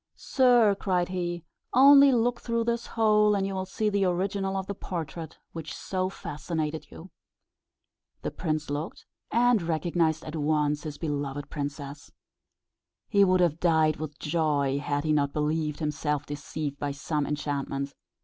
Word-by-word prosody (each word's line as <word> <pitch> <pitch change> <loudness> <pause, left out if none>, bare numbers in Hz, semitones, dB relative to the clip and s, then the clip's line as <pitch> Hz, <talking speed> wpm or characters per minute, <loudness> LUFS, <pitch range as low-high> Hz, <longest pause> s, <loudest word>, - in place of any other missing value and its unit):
"Sir," 245 -6 +4
cried 180 -2 0
he, 175 -2 -3 0.3
"only 280 +1 +8
look 240 0 +1
through 230 -1 0
this 235 0 -1
hole, 210 -2 +3
and 195 -1 0
you 195 - -3
will 190 0 -3
see 215 +3 -1
the 200 -2 +2
original 195 +2 -1
of 190 - -3
the 200 - -4
portrait 165 -4 -6
which 160 -1 -7
so 185 -1 -2
fascinated 155 -2 -4
you." 180 +4 -12 1.1
The - - -2
prince 155 -3 -2
looked, 150 +3 -5 0.2
and 240 -2 +3
recognised 165 -1 0
at 155 - -6
once 150 -1 +1
his 150 -2 -6
beloved 145 -2 -3
princess. 140 -1 -6 1.0
He 200 -1 +5
would 185 -1 +4
have 170 -2 +2
died 160 -3 +3
with 150 -1 -6
joy, 145 -3 0
had 145 0 -1
he 155 -1 +1
not 140 -2 +1
believed 150 0 -1
himself 150 -2 -2
deceived 145 0 -5
by 145 -1 -2
some 145 +1 -2
enchantment. 140 -1 -3
160 Hz, 150 wpm, -27 LUFS, 150-195 Hz, 1.1 s, only